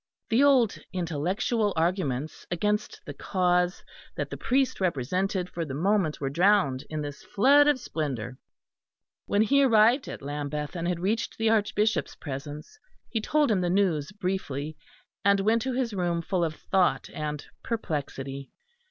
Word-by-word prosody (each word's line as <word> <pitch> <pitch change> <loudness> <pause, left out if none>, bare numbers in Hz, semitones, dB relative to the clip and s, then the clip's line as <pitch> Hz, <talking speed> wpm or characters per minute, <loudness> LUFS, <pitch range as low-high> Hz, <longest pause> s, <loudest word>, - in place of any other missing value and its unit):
The 240 +4 +4
old 260 -7 +4
intellectual 185 +6 -1
arguments 160 -5 -1
against 210 +4 -1
the 145 - -6
cause 180 +2 0 0.3
that - - -4
the - - -3
priest 260 -3 0
represented 180 +4 0
for 170 -2 -4
the 135 -4 -5
moment 185 -1 +1
were 140 - -2
drowned 175 -5 +3
in 155 -1 -3
this 145 -1 -7
flood 280 +7 +4
of 290 -3 +3
splendour. 130 - -4 0.9
When 205 +1 +3
he 280 +6 +4
arrived 240 +1 +4
at - - -7
Lambeth 145 +2 -4
and 170 0 -2
had 175 -1 -1
reached 215 +5 -1
the 225 0 +2
Archbishop's 215 0 +1
presence, 145 - -7 0.3
he 225 - -1
told 295 +2 +2
him 195 -3 +2
the 175 - 0
news 175 -5 +1
briefly, 170 -7 -3 0.5
and 200 0 +4
went 225 +3 +2
to 260 +1 -2
his 245 -3 -1
room 175 -3 -1
full 180 0 0
of 160 -2 -1
thought 180 -9 +1
and 150 -1 -4 0.2
perplexity. 140 - -4
180 Hz, 150 wpm, -27 LUFS, 150-215 Hz, 0.9 s, The